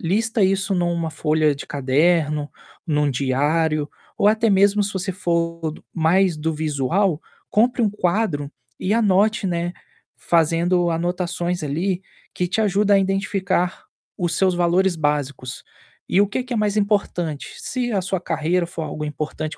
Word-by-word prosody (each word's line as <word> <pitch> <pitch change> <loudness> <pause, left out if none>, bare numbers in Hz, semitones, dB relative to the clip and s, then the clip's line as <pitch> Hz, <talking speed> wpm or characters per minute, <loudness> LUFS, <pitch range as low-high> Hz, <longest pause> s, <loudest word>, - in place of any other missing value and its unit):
Lista 220 +5 +1
isso 195 +1 +1
numa 170 -2 0
folha 155 -1 +1
de 140 - -9
caderno, 150 +2 +1 0.4
em 150 -3 0
um 150 -1 +2
diário 145 +4 0 0.3
ou 205 - +5
até 220 +1 +2
mesmo, 200 +1 +4
se 205 +1 -2
você 190 0 -2
for 170 -3 -1
do - - -14
mais 170 +1 +2
do 160 +2 -1
visual, 155 +4 0 0.3
compre 240 +3 +2
um 215 - +2
quadro 175 -7 -1 0.3
e 195 +3 +1
anote, 210 -1 +2
né, 175 0 -2 0.4
fazendo 170 +2 +2
anotações 175 +1 -2
ali 175 +6 -1 0.3
que 180 -1 -1
te 185 - -2
ajudam 205 0 +3
a - - +5
identificar 190 -2 -1 0.3
os 175 -2 -1
seus 185 0 +2
valores 175 +1 +2
básicos. 145 -4 -2 0.5
E - - +2
o 205 - +2
que 210 +6 -2
que 250 0 -5
é - - 0
mais 210 0 +1
importante? 190 -7 -1
Se 245 -2 -2
a 200 - +1
sua 185 +1 -1
carreira 170 +2 0
for 170 -2 -5
algo 150 0 -5
importante, 155 +1 -4
175 Hz, 155 wpm, -22 LUFS, 155-195 Hz, 0.5 s, ou